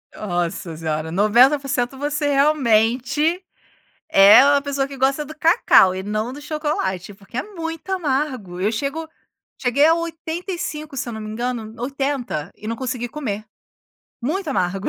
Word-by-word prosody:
Nossa 175 -3 -3
senhora, 160 0 -3
90%. 250 - +3
Você 290 +1 -1
realmente 275 - +2 0.7
é 200 +5 +8
uma 285 0 +4
pessoa 280 -1 -2
que 275 -1 -9
gosta 270 +3 +1
do 310 +2 -10
cacau 195 - +5
e 190 - -4
não 215 +5 -2
do 290 - -9
chocolate, 295 - -3
porque 200 +5 -11
é - - -1
muito 330 -4 -7
amargo. 265 - -2
Eu 205 +4 +1
chego 280 +7 -3 0.5
cheguei 270 +4 +3
a 325 - +6
85, 330 -2 -4
se 250 - -3
eu 235 - -5
não 220 - -6
me 215 - -6
engano, 225 -1 -4
80 270 - -3
e 215 - -10
não 230 - -2
consegui 250 -1 -3
comer. 220 -7 -5 0.8
Muito 315 +7 -2
amargo. 190 -5 -1
260 Hz, 150 wpm, -21 LUFS, 215-300 Hz, 0.8 s, é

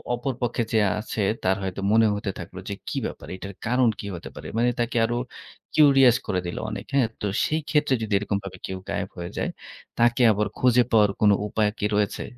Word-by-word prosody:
অপর 130 +2 -3
পক্ষে 120 -1 0
যে 110 - +4 0.2
আছে 110 0 -4 0.2
তার 95 +1 +3
হয়তো 95 +1 -4
মনে 110 0 +5
হতে 100 -1 -3
থাকলো 90 +2 -8
যে - - -2
কি - - -3
ব্যাপার। - - -7
এটার 100 +1 -8
কারণ 125 0 +3
কী 100 - -5
হতে 85 - -8
পারে। - - -8
মানে 120 +1 +3
তাকে 120 0 0
আরো 120 +1 -2 0.6
কিউরিয়াস 135 -5 +6
করে 90 - 0
দিল 85 - -5
অনেক - - -6
হ্যাঁ, 135 -4 +3
তো - - -2 0.2
সেই 155 +1 0
ক্ষেত্রে 150 -3 +2
যদি 110 -1 -3
এরকমভাবে 100 -2 -3
কেউ 95 - -4
গায়েব - - -2
হয়ে 85 0 -5
যায় - - -1 0.5
তাকে 120 +1 +3
আবার 105 +1 0
খুঁজে 125 -1 +4
পাওয়ার 105 -3 +5
কোন 105 -1 +6 0.2
উপায় 105 0 +1
কি - - 0
রয়েছে? 105 -1 0
110 Hz, 205 wpm, -25 LUFS, 100-120 Hz, 0.6 s, কিউরিয়াস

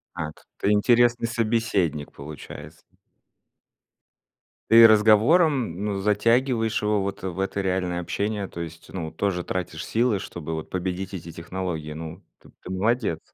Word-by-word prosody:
Так. 75 -1 -6
Ты 100 - +1
интересный 120 +2 +3
собеседник, 110 - 0
получается. 75 +1 -10 1.9
Ты 115 0 +10
разговором, 110 - +4
ну, 100 -2 -2
затягиваешь 115 +2 +2
его 105 -1 +1
вот 100 -1 -4
в 95 -1 -4
это 95 +1 -1
реальное 90 -2 -1
общение. 100 +3 -2
То - - -9
есть, 85 0 -8
ну, 80 -4 -5
тоже 90 -1 -2
тратишь 90 -1 -4
силы, 115 -3 +1
чтобы 80 -4 -6
вот 80 - -6
победить 95 +1 -3
эти 85 -2 -7
технологии. 85 -3 -5
Ну, 80 +1 -8 0.2
т - - -18
ты - - -10
молодец. 100 -2 0
95 Hz, 135 wpm, -24 LUFS, 85-110 Hz, 1.9 s, Ты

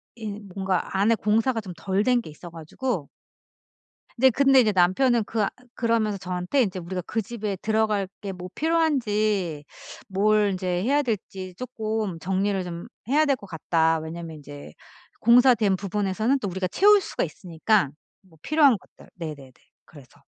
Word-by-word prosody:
인 210 -2 -7
뭔가 190 -1 -2
안에 225 +3 +4
공사가 225 +3 +1
좀 190 -4 -8
덜 195 +3 -1
된 245 0 +3
게 155 - -11
있어 170 +3 -11
가지고. 165 - -4 1.1
네. 260 +2 +5
근데 270 +1 +5
이제 215 -2 +2
남편은 210 +6 +3
그 225 0 -2
아 - - +1 0.3
그러면서 225 -3 +1
저한테 180 +7 -1
"인제 190 -3 -3
우리가 180 +1 -4
그 225 - -1
집에 210 -2 -4
들어갈 215 -2 0
게 200 -2 -4
뭐 180 0 -8
필요한지 215 - 0 0.4
뭘 205 +1 +2
인제 185 0 -4 0.2
해야 285 +4 +3
될지 190 -5 -4
쪼끔 220 -5 -3
정리를 190 +1 0
좀 175 +4 -7 0.2
해야 300 +4 +3
될 280 -2 +2
것 205 - -13
같다." 160 -1 +1
왜냐하면 160 0 -7
인제 145 - -11 0.5
공사된 235 -4 +5
부분에서는 210 +6 0
또 205 - -3
우리가 185 +1 -2
채울 410 - +5
수가 - - -3
있으니까 180 -2 0 0.3
뭐 175 -5 -23
필요한 290 -7 +4
것들. - - -20
네네네. 150 -6 -8 0.3
그래서. 140 -5 -17
205 Hz, 320 characters per minute, -25 LUFS, 180-230 Hz, 1.1 s, 네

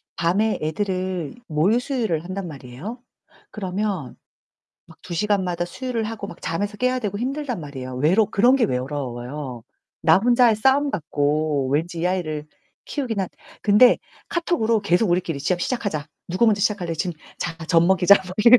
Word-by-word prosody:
밤에 190 +6 +1
애들을 185 0 -2
모유 170 +9 +2
수유를 225 - -1
한단 185 +1 -5
말이에요. 150 - -8 0.5
그러면 190 - -3 0.7
막 - - -17
2 175 - -6
시간마다 185 -2 0
수유를 235 +5 -3
하고 215 -2 -5
막 - - -11
잠에서 200 +6 -2
깨야 255 +2 +1
되고 205 -4 -3
힘들단 265 0 -2
말이에요. 130 -4 -7
외로 170 - +3
그런 240 +7 +4
게 260 - +3
외로워요. 130 -1 -4 0.4
나 160 +1 +6
혼자의 240 +1 +4
싸움 270 +6 +3
같고 150 - 0
왠지 165 +4 -1
이 175 - +1
아이를 155 -5 -2 0.4
키우긴 250 -7 -3
한 190 - -1 0.3
근데 215 +4 +6 0.3
카톡으로 270 -11 +1
계속 195 +1 +2
"우리끼리 175 -4 0
시작 180 +4 0
시작하자. 200 - -2 0.2
누가 185 +7 +2
먼저 210 -2 +3
시작할래? 190 -5 0
지금 175 +3 -2 0.3
자 165 -2 -3
젖먹이자." 180 +3 +6
뭐 185 - -7
이런. 245 +1 +9
185 Hz, 345 characters per minute, -23 LUFS, 155-220 Hz, 0.7 s, 이런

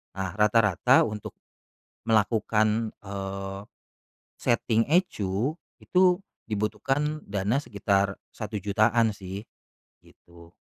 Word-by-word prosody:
Nah 95 -1 -2
rata-rata 105 -3 +4
untuk 105 -1 -6 0.8
melakukan, 110 0 +2 0.2
eee, 95 0 -5 0.8
setting 115 0 +1
ECU 125 - +1 0.3
itu 180 -1 +3 0.3
dibutuhkan 135 +8 -1
dana 100 +5 0
sekitar 100 -2 0 0.2
Rp1.000.000-an 110 +2 +1
sih. 95 +1 -7 0.6
Gitu. 85 0 -19
105 Hz, 80 wpm, -27 LUFS, 100-115 Hz, 0.8 s, rata-rata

